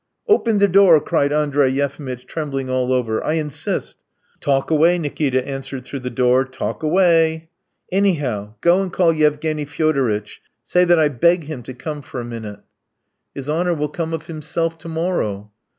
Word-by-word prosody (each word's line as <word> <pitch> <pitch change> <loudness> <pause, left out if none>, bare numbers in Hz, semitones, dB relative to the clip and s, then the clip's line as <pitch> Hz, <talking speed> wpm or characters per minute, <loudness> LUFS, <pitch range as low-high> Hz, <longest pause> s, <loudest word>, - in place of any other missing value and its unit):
"Open 235 - +3
the 200 0 +4
door," 185 -4 +6
cried 145 -1 0
Andrey 145 -2 +2
Yefimitch, 135 -2 -3
trembling 135 -5 -4
all 130 0 0
over; 120 -4 0
"I 155 - 0
insist!" 150 -3 -3 0.4
"Talk 135 +1 0
away!" 165 +3 +4
Nikita 140 -5 -1
answered 135 -2 -6
through 140 - -6
the 125 0 -5
door, 125 +1 +3
"talk 130 -1 -5
away... 165 -1 +2 0.2
." - - -43
"Anyhow, 145 - 0
go 175 +3 +4
and 190 -2 -3
call 170 -2 +3
Yevgeny 150 0 0
Fyodoritch! 135 -9 -1 0.2
Say 180 +8 +3
that 175 0 +4
I 155 -2 +4
beg 170 +6 +2
him 145 -4 -7
to 125 +2 -9
come 150 +3 -6
for 130 -1 -7
a 120 - -5
minute!" 110 -3 -7 0.7
"His 140 -1 -6
honour 170 +3 0
will 150 -1 -2
come 165 +2 -4
of 160 -1 -4
himself 165 +1 -3
to - - -9
morrow." 135 - -2
150 Hz, 170 wpm, -20 LUFS, 130-165 Hz, 0.7 s, door